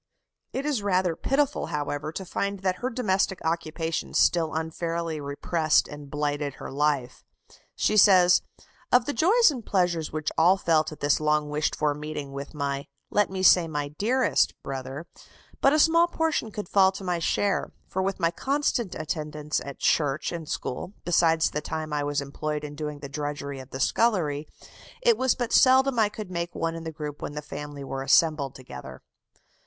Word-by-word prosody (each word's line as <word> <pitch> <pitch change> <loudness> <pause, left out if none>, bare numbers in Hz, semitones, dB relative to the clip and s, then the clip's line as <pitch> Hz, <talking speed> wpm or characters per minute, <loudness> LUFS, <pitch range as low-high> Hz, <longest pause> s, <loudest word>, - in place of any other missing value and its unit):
It 270 - -3
is 290 -7 0
rather 185 -4 +1
pitiful, 285 - 0
however, 145 +1 -3
to 190 +3 -6
find 200 +2 -3
that 185 -1 0
her 250 - -2
domestic 195 -6 0
occupations 165 0 -2
still 165 -3 +3
unfairly 165 0 -3
repressed 155 +3 +1
and 145 -1 -10
blighted 145 -1 -2
her - - -8
life. 140 -2 -1 0.5
She 215 - +1
says: 185 -3 +7 0.5
"Of 245 -1 +5
the 290 - -2
joys 395 - +5
and 250 -5 -6
pleasures 175 -6 0
which 155 -1 -2
all 180 +4 +5
felt 160 -4 +2
at 155 - -11
this 145 0 +3
long 150 -1 +1
wished 150 +1 0
for 150 -1 +1
meeting 150 -1 -6
with 140 +3 -7
my 140 -1 -3 0.2
let 205 -1 +2
me 190 0 -3
say 180 -2 +6
my 145 -2 -3
dearest 230 - +1
brother, 135 +3 -5 0.6
but 275 - +5
a 305 - +3
small 335 +2 +5
portion 320 -8 -1
could 210 -2 -6
fall 190 0 +4
to 195 - -8
my 180 -2 -1
share; 200 +4 0 0.2
for 190 - -2
with 195 +1 -2
my 165 -1 +2
constant 265 -2 -1
attendance 150 -1 -3
at 140 -1 -8
church 145 -1 +1
and 165 -3 -6
school, 150 +9 -4
besides 165 -2 +3
the 150 - -2
time 155 0 -4
I 145 -1 0
was 145 0 -1
employed 150 +2 -4
in 150 -1 -6
doing 150 -1 -5
the 140 - -6
drudgery 140 -1 -4
of 130 0 -11
the 130 - -6
scullery, 155 - +1 0.6
it 475 -2 +5
was 260 - +1
but 240 -2 -3
seldom 260 -1 +5
I 215 -2 +4
could 210 -3 -8
make 170 -1 -3
one 165 0 -1
in 165 0 -7
the 160 - -4
group 150 -2 -7
when - - -5
the 150 0 -5
family 145 -1 -7
were 135 0 -4
assembled 145 -1 +3
together." 65 - -10
160 Hz, 180 wpm, -26 LUFS, 145-195 Hz, 0.6 s, says